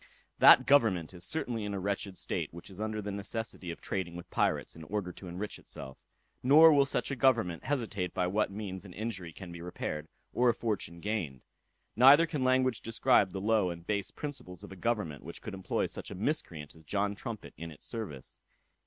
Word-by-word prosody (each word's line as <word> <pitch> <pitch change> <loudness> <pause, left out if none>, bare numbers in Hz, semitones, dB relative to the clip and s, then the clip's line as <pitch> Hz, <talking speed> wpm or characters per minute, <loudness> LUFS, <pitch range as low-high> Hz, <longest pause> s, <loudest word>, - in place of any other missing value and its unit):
That - - +9
government 110 - +3
is 90 -1 -9
certainly 115 - -2
in 100 -1 -3
a - - -2
wretched 100 -1 -3
state, - - -2
which 85 +3 -11
is 95 - -8
under 110 -1 -2
the 105 - -3
necessity 100 -1 -4
of 85 - -6
trading 90 -3 -3
with 85 - -9
pirates, - - 0
in 80 - -10
order 95 +1 -3
to 90 - -11
enrich 90 +4 -5
itself; 65 -1 -8 0.4
nor 155 +5 +8
will 140 -1 +5
such 140 - 0
a - - -1
government 115 -10 +2
hesitate 110 -10 -1
by 90 - 0
what 100 +4 +1
means 95 -2 -6
an 95 -3 -11
injury 100 -5 -4
can 90 +1 -10
be 85 0 -8
repaired, 80 -3 -4 0.3
or 125 0 +4
a 115 - +2
fortune 100 -7 -3
gained. 90 - -3 0.5
Neither 135 +7 +8
can 150 -5 -2
language 130 -2 +2
describe 115 -3 +3
the 95 - -4
low 105 -3 +2
and 85 -1 -7
base 100 -1 -1
principles 130 - -7
of - - -10
a - - -8
government 95 -7 -2
which 85 - -7
could 110 - -7
employ 95 -1 -1
such - - -6
a - - -7
miscreant 90 - -2
as 80 - -17
John 100 +5 0
Trumpet 110 +1 -7
in 85 0 -7
its 75 - -12
service. 100 - -6
100 Hz, 205 wpm, -31 LUFS, 90-115 Hz, 0.5 s, That